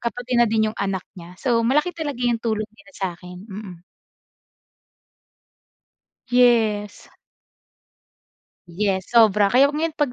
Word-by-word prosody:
ka 235 - -1
pati 245 +1 -7
na 235 - +4
din 220 0 +1
'yong - - -16
anak 195 -2 -2
niya. 175 0 -12
So, 240 -3 +1
malaki 300 +9 +1
talaga 295 -7 -5
'yong 235 -2 +1
tulong 220 -2 -1
nila 285 +5 -20
sa 190 -3 -3
akin, 180 0 -12
mm. 190 -4 -9 2.5
Yes. 230 -4 +2 1.6
Yes, 190 +1 -2
sobra. 210 -4 +4
Kaya 275 +6 +4
ngayon 315 +1 -2
pag 290 -5 0
225 Hz, 130 wpm, -22 LUFS, 195-250 Hz, 2.5 s, na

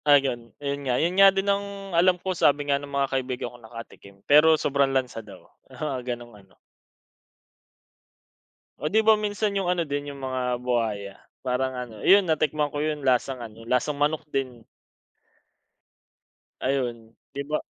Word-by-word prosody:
Ayun, 135 -5 +3
ayun 140 0 -3
nga. 125 - +2
'Yon 170 +5 +1
nga 195 +1 +8
din 195 0 -1
ang 200 -1 -2
alam 180 +2 +4
ko, 185 +1 -3
sabi 145 -4 +2
nga 140 -1 +1
ng 145 - -9
mga 140 -1 -1
kaibigan 125 -2 -3
kong 120 -2 -15
nakatikim. 115 -4 -11
Pero 155 +2 +6
sobrang 140 -2 +1
lansa 130 -4 -1
daw, - - -14 0.2
oo, 150 -3 -4
gano'ng 120 -1 -6
ano. 95 -1 -25 2.3
O, 150 - -2
'di 215 +7 +3
ba, 220 -1 +5
minsan 205 0 -1
yung 195 -2 -1
ano 175 -1 0
din, 145 -1 -4
yung 140 - -11
mga 125 -2 -2
buwaya, 110 -5 -1 0.3
parang 130 0 -1
ano, 125 -3 -6
'yon 200 +1 +7
natikman 155 -2 0
ko 145 - -4
'yon, 150 0 -2
lasang 130 0 +1
ano, 115 0 -11
lasang 125 +4 0
manok 150 +2 0
din. 130 -4 -3 2.0
Ayun. 120 -4 -2 0.2
'Di 140 - -4
ba 150 - 0
140 Hz, 160 wpm, -25 LUFS, 125-160 Hz, 2.3 s, nga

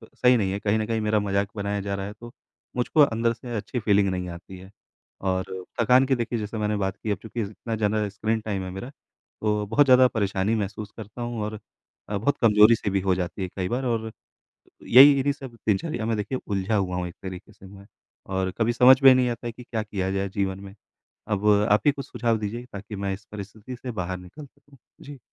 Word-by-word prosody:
सही 125 0 +4
नहीं 100 -4 0
है, 100 - -2
कहीं 105 +1 +1
न 110 - -1
कहीं 115 -1 -1
मेरा 105 0 +2
मजाक 100 0 0
ही 105 - -11
बनाया 100 0 -2
जा 100 0 -3
रहा 95 0 -4
है 100 - -7
तो 120 0 -9 0.4
मुझको 125 +5 +2
अंदर 115 -4 +3
से 120 +1 -7
अच्छी 115 +4 -3
फीलिंग 100 -3 +3
नहीं 90 -1 -3
आती 90 +2 -10
है। 95 +1 -13 0.5
और 95 -1 -2 0.2
थकान 125 +3 +5
की 135 0 +2
देखिए 120 -1 -2
जैसे 105 +1 -5
मैंने 105 0 0
बात 95 -1 -2
की 110 - -3
अब 100 - 0
चूँकि 115 +1 -4
ज़ - - -4
अब - - -13
इतना 115 +1 -5
ज़्यादा 105 -1 0
स्क्रीन 110 +3 -1
टाइम 100 -3 -3
है 95 - -5
मेरा। 95 +7 -7
तो 105 -6 -5
बहुत 145 +7 +4
ज़्यादा 130 -1 +7
परेशानी 100 -2 0
महसूस 105 0 -4
करता 110 +2 -9
हूँ 120 -2 -3
और 105 +1 -4 0.6
अ, 105 - -1
बहुत 140 +8 0
कमजोरी-सी 110 -1 +5
भी 95 0 0
हो 95 -1 +1
जाती 90 +2 -4
है 95 - -2
कई 90 -2 -2
बार 130 +2 -2
और 110 -2 -1 0.8
यही 135 +4 +9
इन्हीं 140 +1 +1
सब 135 -4 -10
दिनचर्या 110 - 0
मैं 115 -1 0
देखिए 125 +5 -3
उलझा 100 +1 -1
हुआ 95 -3 0
हूँ 90 0 -2
एक 85 - -10
तरीके 95 +2 -8
से 95 - -16
मैं 100 +1 -14 0.5
और 95 0 0
कभी 115 +1 +1
समझ 130 +2 +7
में 135 - +11
ही 130 - +7
नहीं 125 -1 +2
आता 120 0 -4
है - - -3
कि 125 - -12
क्या 115 -2 -3
किया 95 -3 -3
जाए 95 0 -1
जीवन 95 -1 -2
में। 100 0 -11 0.5
अब 105 -1 -1 0.2
आप 105 - +5
ही 145 - +6
कुछ 140 0 -7
सुझाव 115 -2 0
दीजिए 110 +3 -4
ताकि 105 +1 -7
मैं 100 0 -2
इस 100 +2 -12
परिस्थिति 105 +4 -8
से 125 +1 -7
बाहर 90 -3 -4
निकल 95 - -11
सकूँ। 140 +1 -24 0.3
जी। 145 -1 -10
105 Hz, 235 wpm, -25 LUFS, 100-120 Hz, 0.8 s, में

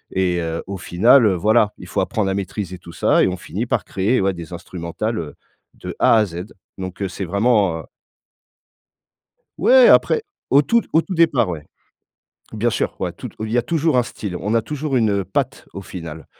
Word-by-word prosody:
et 90 -2 +1
heu, 80 -1 -3
au 100 0 -5
final, 110 +9 +4
heu, 100 - +4
voilà, 105 +3 +2
il - - -11
faut 100 - -2
apprendre 95 +1 0
à - - 0
maîtriser 95 -1 -4
tout 85 -1 -13
ça - - +3
et - - +3
on 90 - -2
finit 100 +5 -5
par - - -1
créer, 100 +6 0
ouais, 95 0 +2
des 85 0 -9
instrumentales, 85 +6 -4
heu, 80 -3 -7 0.4
de - - -8
A - - +5
à 110 - +4
Z. 90 -1 -6 0.3
Donc 95 0 -7
heu, 95 - -1
c'est 95 +1 -5
vraiment 100 -2 +2
un - - -11 1.7
Ouais! - - +7
Après 455 -2 +4 0.3
au 140 - +6
tout 235 +9 +3
au 160 - +5
tout 190 - -6
départ, 160 - +3
ouais. 80 -4 -6 0.9
Bien 110 +2 +1
sûr, - - -2
ouais, - - -2
toute - - -9
il 110 0 -4
y 120 - +2
a - - +4
toujours 155 +2 +1
un 125 - +4
style, 100 -5 -6
on 105 +4 -2
a 115 - +3
toujours 150 +1 -2
une, 110 -3 +2
heu, 100 -1 0
patte 130 +8 -2
au 100 - -6
final. 80 -4 -8
100 Hz, 210 wpm, -20 LUFS, 90-120 Hz, 1.7 s, Ouais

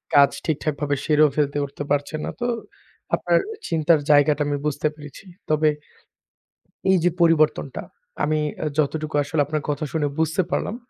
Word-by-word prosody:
কাজ 140 -1 +7 0.2
ঠিকঠাকভাবে 150 -2 -1
সেরেও 155 -1 +4
ফেলতে 145 -1 0
উঠতে 140 +1 -7
পারছেন 145 +2 0
না। - - -3
তো 240 - -2 0.7
আপনার - - +1 0.3
চিন্তার 160 0 +3
জায়গাটা 145 0 +4
আমি 145 0 0
বুঝতে 150 +1 0
পেরেছি। 150 +4 -12 0.2
তবে 155 0 +3 1.2
এই 190 - +5
যে, 175 - +4
পরিবর্তনটা, 155 -5 +2 0.4
আমি 155 +1 +1 0.2
অ্যা - - -2
যতটুকু 155 0 -1
আসলে 145 +1 0
আপনার 155 +1 -2
কথা 150 +1 -1
শুনে 150 -2 +1
বুঝতে 160 +4 +2
পারলাম। 215 - -1
150 Hz, 150 wpm, -23 LUFS, 145-155 Hz, 1.2 s, কাজ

